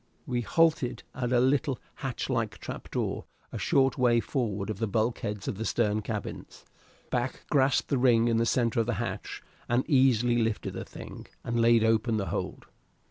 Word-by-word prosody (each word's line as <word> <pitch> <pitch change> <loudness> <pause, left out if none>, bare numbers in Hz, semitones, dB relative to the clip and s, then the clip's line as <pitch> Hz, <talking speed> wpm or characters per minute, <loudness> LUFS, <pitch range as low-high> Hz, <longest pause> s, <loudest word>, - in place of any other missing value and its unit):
We 120 -1 -1
halted 140 -3 +2
at 125 -1 -2
a 125 - +4
little 135 +1 +2 0.2
hatch - - -3
like - - -1
trap - - -8
door - - -2 0.3
a - - -5
short 135 0 +2
way 120 -2 +4
forward 110 -6 -2
of 100 - -6
the 115 - 0
bulkheads 110 -1 -1
of 100 - -3
the - - -1
stern 110 -2 +1
cabins. 105 -1 -6 0.5
Back 125 +1 -2
grasped 135 -2 +3
the 140 - +1
ring 120 -2 +4
in 115 -1 +2
the 115 0 +2
center 115 -1 +1
of 115 - +1
the 120 - 0
hatch, 120 +4 -5 0.3
and 120 +2 +1
easily 125 -5 +4
lifted 115 -1 -1
the - - -5
thing, - - -10 0.2
and 120 0 0
laid 115 -1 +5
open 110 0 +2
the 100 - -2
hold. - - -4
120 Hz, 185 wpm, -28 LUFS, 110-130 Hz, 0.5 s, laid